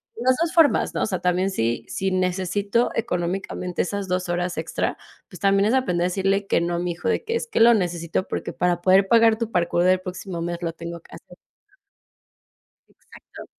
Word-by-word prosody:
de 450 - -8
las 255 0 +4
dos 335 -1 0
formas, 325 -4 +3
¿no?, - - -2
o - - +2
sea, 185 -4 -2
también 180 +1 +1
sí, 115 -9 -2
si 190 +10 -1
necesito 190 +4 0
económicamente 180 -2 -2
esas 200 +1 -3
dos 180 0 -2
horas 175 0 -2
extra, - - -2 0.3
pues 180 - -13
también 195 0 +3
es 220 - +2
aprender 180 -10 +1
a - - +1
decirle 195 +2 0
que - - +2
no 170 0 -1
a - - -1
mi 175 0 -2
hijo, 170 0 -3
de - - 0
que: 460 +1 -2
"Es 465 - -2
que 460 - -2
lo 235 +1 +7
necesito 175 -3 -1
porque - - -4
para 175 -1 0
poder 190 +2 +4
pagar 225 0 +5
tu 230 -2 -2
parkour 175 -1 +1
del 185 0 +4
próximo 185 -1 -6
mes 175 0 -4
lo 170 -1 -2
tengo 170 0 -8
que - - -22
hacer". - - -15 1.5
Exacto. - - -15
185 Hz, 210 wpm, -23 LUFS, 175-200 Hz, 1.5 s, lo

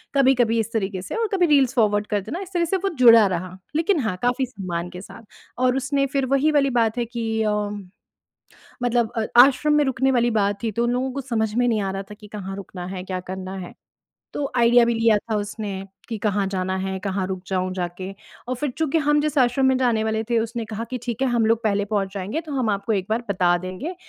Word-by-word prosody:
कभी-कभी 250 -4 +3
इस 225 +1 -2
तरीके 195 -3 -2
से - - -5
और 455 -1 0
कभी 365 -2 +3
रील्स 275 -4 +4
फ़ॉरवर्ड 210 -3 +2
कर 205 -1 0
देना 260 - -5
इस 380 -1 -9
तरह 345 -1 +2
से 380 +4 0
वो 390 +1 -1
जुड़ा 230 -3 +8
रहा। 185 0 -4 0.2
लेकिन 330 +2 +2
हाँ, 220 -7 -1
काफ़ी 250 +2 +1
सम्मान 180 -6 -5
के 180 0 -9
साथ 195 +3 -12 0.4
और 255 +1 +2
उसने 275 +1 0
फ़िर 275 -1 +1
वही 300 +3 +3
वाली 285 -2 +3
बात 225 0 +1
है 240 - 0
कि 225 -1 -2
अ, 215 - +1 1.3
मतलब 240 -1 +1
अ 220 -1 0 0.2
आश्रम 290 +3 +3
में 295 -1 +4
रुकने 265 0 +1
वाली 240 -1 +2
बात 200 +2 -1
थी 225 - 0
तो 235 +3 0
उन 240 - +1
लोगों 255 +1 -1
को 275 - -3
समझ 220 -4 -1
में 245 0 +2
नहीं 220 -2 +1
आ 195 - -2
रहा 195 - -4
था - - -7
कि 210 0 -14
कहाँ 195 -2 -6
रुकना 185 -2 -7
है, 185 0 -6
क्या 185 -1 -4
करना 185 +1 -6
है? - - -13 0.6
तो 285 -1 -3
आइडिया 240 0 +5
भी 235 - +1
लिया 225 -1 +4
था 220 +1 -3
उसने 205 0 -4 0.4
कि 230 - -3
कहाँ 200 -1 0
जाना 185 -1 -2
है, 190 0 -3
कहाँ 190 -1 -2
रुक 185 -1 -5
जाऊँ 185 -1 -1
जाके? 180 +1 -4 0.4
और 255 - 0
फ़िर 285 +1 -2
चूँकि 320 0 +1
हम 295 0 +2
जिस 300 0 -2
आश्रम 255 +1 +3
में 260 -1 +4
जाने 235 -4 +1
वाले 220 0 0
थे 235 - +3
उसने 230 +1 -3
कहा 220 +1 -5
कि 255 - -3
ठीक 240 0 -3
है 265 - +2
हम 235 -2 +2
लोग 230 +1 +2
पहले 205 -1 +1
पहुँच 200 -2 -2
जाएँगे, 200 - -3
तो 310 -2 -9
हम 255 -6 0
आपको 200 +2 -1
एक 195 -2 -1
बार 225 +2 0
बता 180 -2 +3
देंगे। 255 - -5
225 Hz, 240 wpm, -23 LUFS, 195-260 Hz, 1.3 s, जुड़ा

